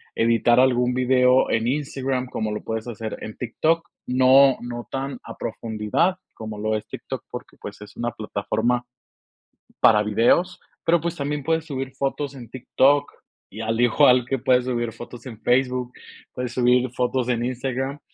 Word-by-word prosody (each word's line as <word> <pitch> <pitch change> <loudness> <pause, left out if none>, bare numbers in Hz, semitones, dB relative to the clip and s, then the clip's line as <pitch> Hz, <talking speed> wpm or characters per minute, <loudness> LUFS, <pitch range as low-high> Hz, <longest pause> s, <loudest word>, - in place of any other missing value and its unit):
editar 115 +1 +3
algún 125 -1 +3
video 125 0 +3
en 115 +1 +1
Instagram, 135 -2 -2
como 110 -3 -3
lo 105 - -4
puedes 110 +1 -4
hacer 110 -2 -5
en 110 - -7
TikTok. 165 +6 -1 0.2
No 130 +1 +5
no 120 0 -6
tan 135 +1 -3
a - - -9
profundidad 115 - -1 0.2
como 110 -1 -7
lo 110 +1 0
es 105 - -4
TikTok, - - -7
porque, - - -9
pues, - - -9
es 105 - -12
una 120 0 -2
plataforma 110 +2 -1 1.0
para 105 -2 +6
videos. 120 - +2 0.2
Pero, 170 0 +3
pues, 170 0 -2
también 145 -1 -3
puedes 160 +1 0
subir 135 -3 -4
fotos 140 +1 -2
en 120 -4 -10
TikTok, 135 +3 +2 0.4
y 110 +3 -8
al 115 +1 -1
igual 125 +1 +5
que 135 - 0
puedes 125 -1 +3
subir 120 -2 -1
fotos 120 +2 -10
en 115 -4 -9
Facebook, 125 0 +1 0.4
puedes 125 -1 -4
subir 125 0 +3
fotos 125 0 -1
en 120 -1 0
Instagram, 130 +2 -3
125 Hz, 160 wpm, -23 LUFS, 115-135 Hz, 1.0 s, para